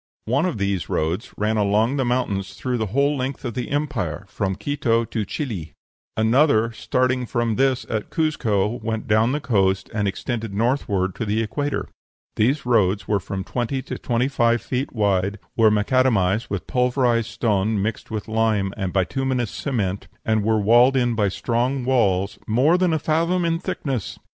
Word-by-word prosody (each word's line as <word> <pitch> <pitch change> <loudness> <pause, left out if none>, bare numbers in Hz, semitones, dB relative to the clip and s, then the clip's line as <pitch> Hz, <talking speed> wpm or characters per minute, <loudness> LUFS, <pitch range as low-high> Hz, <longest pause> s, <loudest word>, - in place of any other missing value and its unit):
One 140 +10 +1
of 175 - -3
these 100 -5 -1
roads 85 +9 -1
ran 110 +1 0
along 105 +6 +2
the 135 - +1
mountains 110 -6 -1
through 125 -2 -2
the 110 - -1
whole 140 +7 +1
length 135 +1 -4
of 120 - -3
the 125 +1 -4
empire, 140 - -2
from 95 -1 -2
Quito 115 0 0
to 110 -2 -3
Chili; 105 - -5 0.4
another, 115 0 +3
starting 125 +2 0
from 120 -2 0
this 130 0 +1
at 110 -2 -3
Cuzco, 115 -9 0
went 110 0 -3
down 110 +1 +3
to - - -1
the 150 - 0
coast, 95 -6 +1
and 105 -2 0
extended 110 +1 -3
northward 100 -5 0
to - - -2
the 110 +1 0
equator. 145 +5 -2 0.5
These 130 +7 +1
roads 105 -5 +2
were 105 -1 +2
from 95 0 -5
twenty 125 +5 -2
to - - -6
twenty 120 +1 0
five 120 -4 +1
feet 130 +2 -2
wide, 100 -2 +1 0.2
were 110 -2 +5
macadamized 105 -2 +2
with 100 -2 -3
pulverized 125 -2 +1
stone 105 -2 0
mixed 110 +2 -3
with 110 -2 -4
lime 110 -3 +1
and 95 -3 -3
bituminous 125 +5 0
cement, 100 -9 -2 0.2
and 110 -1 +1
were 110 0 +2
walled 120 +6 +5
in 120 -2 +2
by 105 -3 +1
strong 125 +5 -1
walls 100 -6 +1
"more 130 +10 +3
than 180 -1 +2
a 160 - +2
fathom 170 +4 +1
in 165 0 +1
thickness." 140 - -3
115 Hz, 170 wpm, -22 LUFS, 105-130 Hz, 0.5 s, were